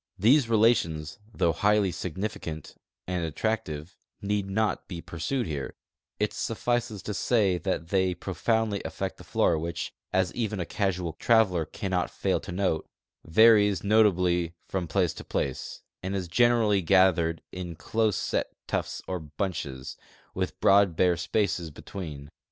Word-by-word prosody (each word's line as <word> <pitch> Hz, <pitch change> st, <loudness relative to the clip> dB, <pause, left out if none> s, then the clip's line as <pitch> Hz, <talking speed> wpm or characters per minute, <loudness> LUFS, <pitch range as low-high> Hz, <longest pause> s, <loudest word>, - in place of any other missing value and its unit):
These 120 Hz, +5 st, +4 dB
relations, 105 Hz, -7 st, +2 dB, 0.2 s
thougli 85 Hz, -3 st, +2 dB
highly 105 Hz, -2 st, +3 dB
significant 85 Hz, -3 st, -5 dB, 0.3 s
and 90 Hz, -1 st, -2 dB
attract 105 Hz, +6 st, -1 dB
ive, 75 Hz, +4 st, -7 dB, 0.2 s
need 100 Hz, -1 st, -1 dB
not 110 Hz, +2 st, 0 dB
be 90 Hz, -3 st, -6 dB
pursued 90 Hz, -, -3 dB
here; 70 Hz, -6 st, -4 dB, 0.4 s
it 105 Hz, 0 st, 0 dB
suffices 115 Hz, -2 st, -2 dB
to 105 Hz, -, -3 dB
say 100 Hz, -4 st, +2 dB
that 80 Hz, 0 st, -2 dB
they 95 Hz, -2 st, +2 dB
pro 95 Hz, +2 st, -6 dB
foundly 110 Hz, +2 st, 0 dB
affect -, -, -4 dB
the -, -, -12 dB
flora 80 Hz, -, +2 dB
which, 85 Hz, +1 st, -4 dB, 0.2 s
as 95 Hz, -1 st, +1 dB
even 110 Hz, -4 st, -2 dB
a 90 Hz, -, -1 dB
casual 90 Hz, -5 st, -1 dB
traveler 95 Hz, -4 st, +3 dB
cannot 90 Hz, +2 st, -2 dB
fail -, -, 0 dB
to -, -, -8 dB
note, 90 Hz, -3 st, 0 dB, 0.4 s
varies 105 Hz, +2 st, +5 dB
notably 90 Hz, -5 st, +3 dB
from 95 Hz, -3 st, -2 dB
place 90 Hz, +1 st, +1 dB
to -, -, -9 dB
place, 65 Hz, -, -3 dB, 0.2 s
and 95 Hz, +2 st, -3 dB
is 95 Hz, -2 st, -2 dB
generally 110 Hz, 0 st, +3 dB
gathered 85 Hz, -2 st, +3 dB
in 90 Hz, -2 st, -6 dB
close 110 Hz, +1 st, 0 dB
set -, -, -1 dB, 0.2 s
tufts -, -, -3 dB
or 90 Hz, -1 st, -2 dB
bunches, 75 Hz, -5 st, -5 dB, 0.4 s
with -, -, -3 dB
broad 100 Hz, -3 st, +5 dB
bare 90 Hz, +1 st, +3 dB
spaces 90 Hz, -3 st, -1 dB
between 75 Hz, -3 st, -8 dB
95 Hz, 145 wpm, -27 LUFS, 85-105 Hz, 0.4 s, varies